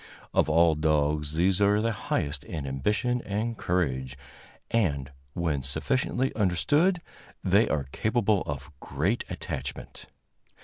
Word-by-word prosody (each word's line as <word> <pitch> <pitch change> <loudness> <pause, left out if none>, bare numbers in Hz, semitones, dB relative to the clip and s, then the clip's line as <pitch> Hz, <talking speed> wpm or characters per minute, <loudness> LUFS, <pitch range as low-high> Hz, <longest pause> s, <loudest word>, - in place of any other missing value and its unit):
Of - - +3
all 80 +1 +5
dogs 75 -1 +1
these 90 +4 +2
are 100 +1 +4
the 115 +1 +1
highest 75 -8 -2
in 75 -4 -5
ambition 105 - 0
and 110 +3 -2
courage, 65 - -1 0.5
and, 70 - +1 0.2
when 80 -5 -1
sufficiently 130 - -1
understood, 145 - +2 0.4
they 100 +5 +4
are 75 -3 0
capable 110 - +1
of 70 +1 -5
great 85 - -1
attachment. 70 +1 -6
85 Hz, 120 wpm, -27 LUFS, 70-110 Hz, 0.5 s, all